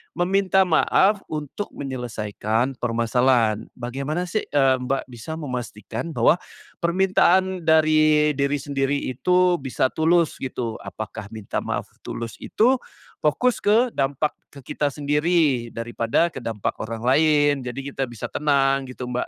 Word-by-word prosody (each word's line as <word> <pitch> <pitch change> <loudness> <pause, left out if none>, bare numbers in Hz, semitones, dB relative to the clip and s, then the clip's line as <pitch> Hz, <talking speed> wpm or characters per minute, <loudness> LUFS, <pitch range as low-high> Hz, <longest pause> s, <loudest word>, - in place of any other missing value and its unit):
meminta 190 +1 +2
maaf 195 +5 +3
untuk 155 +6 -5
menyelesaikan 120 -2 -2
permasalahan? 115 -1 +1
Bagaimana 135 +7 -3
sih, 215 +4 -1
eee, 135 -2 +3
Mbak 135 +2 -1
bisa 120 +7 -7
memastikan 125 +1 -5
bahwa, 120 +8 +4 0.5
permintaan 185 0 +2
dari 155 -1 +4
diri 140 +1 +1
sendiri 140 0 0
itu 180 +7 +2
bisa 130 -1 0
tulus 165 +1 +2
gitu? 120 -4 -4
Apakah 105 -1 -7
minta 105 -2 -3
maaf - - -3 0.2
tulus 115 -1 -6
itu, 255 +4 +2 0.5
fokus 235 +11 +2
ke 225 +5 +4
dampak 140 +2 0 0.2
ke 140 - -12
kita 145 -1 0
sendiri 150 -4 +1
daripada 115 +7 0
ke 140 - -8
dampak 110 -3 -3
orang 115 0 -5
lain? 145 +2 +4
Jadi 135 +3 -5
kita 135 - -1
bisa 120 - -6
tenang 135 -2 +2
gitu, 125 -1 -7
Mbak, 125 0 -2
140 Hz, 130 wpm, -23 LUFS, 120-160 Hz, 0.5 s, bahwa